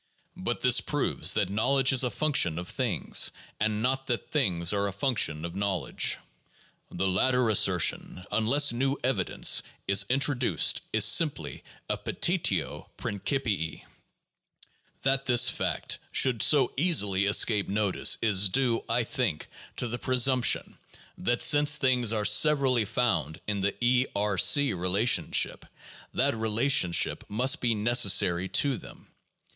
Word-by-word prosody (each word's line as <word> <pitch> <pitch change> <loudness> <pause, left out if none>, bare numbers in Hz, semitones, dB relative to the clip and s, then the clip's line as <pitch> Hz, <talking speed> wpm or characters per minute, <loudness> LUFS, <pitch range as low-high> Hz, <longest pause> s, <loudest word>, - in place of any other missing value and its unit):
But - - -4
this - - +3
proves - - -1
that 100 -3 -1
knowledge 135 +6 +1
is 130 - +3
a 125 - 0
function 115 - 0
of 90 0 -6
things, 120 - 0 0.3
and 110 0 -1
not 135 +1 -2
that 120 -2 -4
things 90 - 0
are 100 0 -1
a - - -4
function 95 - -1
of 85 +1 -8
knowledge. 100 -3 -1 0.7
The 95 - -2
latter 125 +6 +1
assertion, 90 -2 +1
unless 135 +6 +2
new 135 +3 -1
evi 120 -7 0
dence - - +1 0.3
is 100 0 +2
introduced, 130 - +1
is 110 -1 +3
simply 110 - +1 0.2
a - - -3
petitio 160 - -2
prineipii. 100 - -3 1.2
That 135 0 0
this 120 -2 +4
fact - - -2
should 125 -5 +2
so 140 -5 +3
easily 105 - +1
escape 105 0 +2
notice 100 -1 0
is 100 -3 +2
due, 125 +1 0
I 120 +1 +1
think, 120 - -3 0.3
to 125 - -3
the 120 +1 -4
presumption 130 0 0 0.4
that 120 +5 -1
since 145 0 +4
things 125 -5 +1
are 105 -2 -1
severally 130 +1 +3
found 95 - -2
in 105 -1 -3
the 100 +1 -1
(E)R 105 -6 0 0.2
e 145 -6 0
relationship, 95 +6 0 0.5
that - - 0
rela 110 +1 -1
tionship 90 -11 +1
must 125 +6 +1
be 115 -2 0
necessary 100 -5 +2
to 135 -6 0
them. - - -14
115 Hz, 135 wpm, -27 LUFS, 100-130 Hz, 1.2 s, this